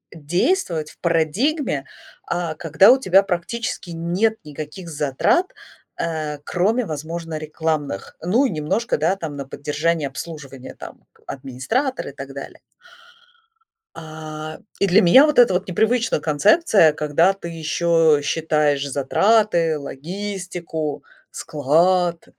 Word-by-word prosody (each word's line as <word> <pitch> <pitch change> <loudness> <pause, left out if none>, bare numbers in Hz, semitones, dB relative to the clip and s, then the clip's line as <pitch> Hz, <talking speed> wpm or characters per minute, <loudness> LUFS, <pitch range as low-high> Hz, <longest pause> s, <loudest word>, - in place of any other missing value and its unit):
действовать 165 - -1
в - - -23
парадигме, 170 - 0 0.4
а, 170 -2 -3
когда 170 +7 +5
у 260 - +6
тебя 195 -6 +4
практически 195 +2 -3
нет 175 +7 0
никаких 155 +4 -8
затрат, 150 - +1 0.5
э, 155 -3 -3
кроме, 215 +7 +1
возможно, 160 0 -5
рекламных. 155 - -3
Ну 220 +11 +2
и - - +1
немножко, 170 +8 -1
да, 165 +5 +1
там 160 -6 -6
на 140 -1 -6
поддержание 150 +3 -1
обслуживания, 135 -1 -8
там - - -11 0.2
администратор 140 - -3
и - - -6
так - - -9
далее. - - -9 1.4
А, 155 0 -8 0.2
и 200 - +2
для 195 +4 +5
меня 240 +11 +7
вот 300 -4 +2
эта 240 -6 +6
вот 180 +2 -1
непривычна 220 +3 +1
концепция, 170 - +4
когда 155 +5 +2
ты 195 -3 -9
еще 165 -1 +2
считаешь 150 -2 +1
затраты, 165 +4 +2
логистику, 175 +1 -5 0.3
склад. 170 +4 +1
165 Hz, 120 wpm, -21 LUFS, 150-195 Hz, 1.4 s, меня